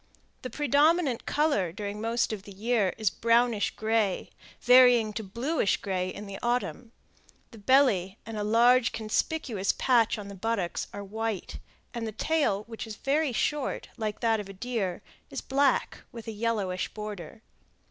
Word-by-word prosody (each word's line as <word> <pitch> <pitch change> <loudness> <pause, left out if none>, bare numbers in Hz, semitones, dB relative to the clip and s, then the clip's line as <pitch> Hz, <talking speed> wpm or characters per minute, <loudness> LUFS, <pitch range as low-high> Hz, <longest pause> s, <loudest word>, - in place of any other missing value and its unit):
The 255 - -5
predominant 290 0 +2
color 290 - +1
during 205 +2 -5
most 230 0 0
of 210 - -5
the 200 - -12
year 210 -1 0
is 215 -5 +1
brownish 230 -2 +2
gray, 220 -3 0 0.3
varying 245 -3 +6
to 220 - -4
bluish 235 - 0
gray 185 -2 -2
in 205 +3 -7
the 200 -1 -7
autumn; 240 -1 -2 0.6
the 225 - -12
belly 205 -5 +3
and 225 - -7
a 210 - -2
large, 235 +3 +4
conspicuous 220 -1 -1
patch 235 -5 +2
on 205 -2 -7
the 200 - -8
buttocks 195 -2 -2
are 205 - -7
white; 220 0 -4 0.3
and 235 -2 -3
the - - -4
tail, 280 -6 0
which 225 +1 -8
is 215 - -7
very 280 +5 0
short, 290 +4 -2
like 215 -3 -4
that 225 -2 +2
of 200 -1 -7
a - - -8
deer, 195 -4 -3 0.3
is - - -5
black, 275 -1 +1
with 230 -2 -10
a - - -3
yellowish 210 -4 -1
border. 210 0 -7
225 Hz, 160 wpm, -28 LUFS, 205-245 Hz, 0.6 s, varying